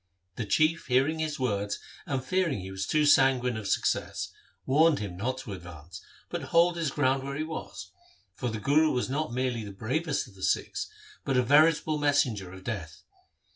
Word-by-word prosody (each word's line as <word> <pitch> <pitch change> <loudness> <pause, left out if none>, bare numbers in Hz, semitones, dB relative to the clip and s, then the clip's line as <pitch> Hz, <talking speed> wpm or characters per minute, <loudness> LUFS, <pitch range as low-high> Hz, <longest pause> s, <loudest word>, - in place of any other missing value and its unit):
The 110 - -4
Chief 155 +8 +2
hearing 135 +5 +2
his 155 -1 -2
words 105 -5 -1 0.3
and 135 -2 -1
fearing 170 - 0
he 95 +1 -7
was 95 0 -4
too 150 -1 +2
sanguine 130 -4 +4
of 110 -2 -5
success, - - -1 0.3
warned 155 +3 +4
him 100 -4 -5
not 125 +7 -2
to 110 -6 -7
advance, 85 -2 -10 0.3
but - - -4
hold 170 +1 +4
his 165 -3 -1
ground 135 -1 +1
where 140 +1 -5
he 155 - -2
was, 155 - -7 0.4
for 120 +5 -3
the 110 -1 -4
Guru 150 +7 +3
was 125 -1 -1
not 150 -1 -1
merely 125 -2 -1
the 100 - -7
bravest 135 - -2
of 110 - -16
the 95 - -15
Sikhs, - - -1 0.3
but 135 -2 0
a 125 - +4
veritable 155 +3 +4
messenger 130 -10 +1
of 95 0 -11
death. 85 -6 -6
130 Hz, 185 wpm, -28 LUFS, 105-150 Hz, 0.4 s, sanguine